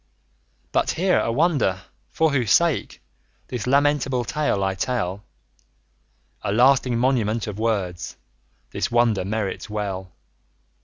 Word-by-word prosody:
But - - +1
hear 185 +2 +3
a 115 - 0
wonder, 135 - +1 0.3
for 160 -1 +1
whose 125 -6 0
sake 170 -3 +2
50 - - -20 0.5
This 125 -2 -4
lamentable 140 -2 +2
tale 145 -8 0
I 95 0 0
tell! 100 -2 -2 1.2
A - - -2
lasting 125 +2 +4
monument 115 -3 +1
of 105 -1 -6
words 100 -6 -2 0.5
This - - -2
wonder 120 -4 +2
merits 105 +1 -3
well. 100 -3 -4
115 Hz, 120 wpm, -23 LUFS, 100-135 Hz, 1.2 s, lasting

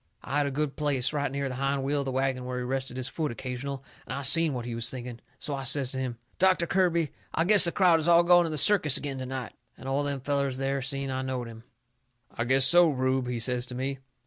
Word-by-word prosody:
I 145 - -1
had 145 - +1
a - - -1
good 145 +1 -2
place, 140 -3 0
right 145 -2 -1
near 140 0 -2
the 130 - -5
hind 135 +1 -1
wheel 145 +2 0
of 140 - -2
the 135 - -2
wagon 130 -1 -1
where 125 0 -4
he 125 - -3
rested 130 0 -3
his 130 0 -1
foot 155 -4 -3
occasional, 130 +3 -6 0.2
and - - -5
I 140 - -5
seen 160 +4 +4
what 120 -1 -5
he 120 - -5
was 115 0 -1
thinking. 125 -2 -7 0.2
So 145 - -4
I 135 - -3
says 135 0 +1
to 130 - -4
him: 125 -3 -4 0.2
"Doctor 185 -2 +3
Kirby, 170 -3 +1 0.2
I 165 - +2
guess 205 0 +6
the 170 - +1
crowd 175 -2 +4
is 155 - -1
all 170 0 +6
gone 175 0 +5
to - - -2
the 155 - -3
circus 155 -5 +4
agin 140 -2 -5
to 130 - -5
night." 130 -3 -5 0.2
And - - -10
all 135 +2 0
them 140 -2 -3
fellers 140 -1 -1
there 135 0 -1
seen 135 +1 -2
I 130 0 -2
knowed 130 -2 -3
him. 115 0 -12 0.7
"I 120 - -2
guess 130 +1 +3
so, 175 -1 +6
Rube," 130 -2 0
he 125 -1 -2
says 125 +1 0
to 125 - -7
me. 135 +1 -3
135 Hz, 265 wpm, -27 LUFS, 130-150 Hz, 0.7 s, guess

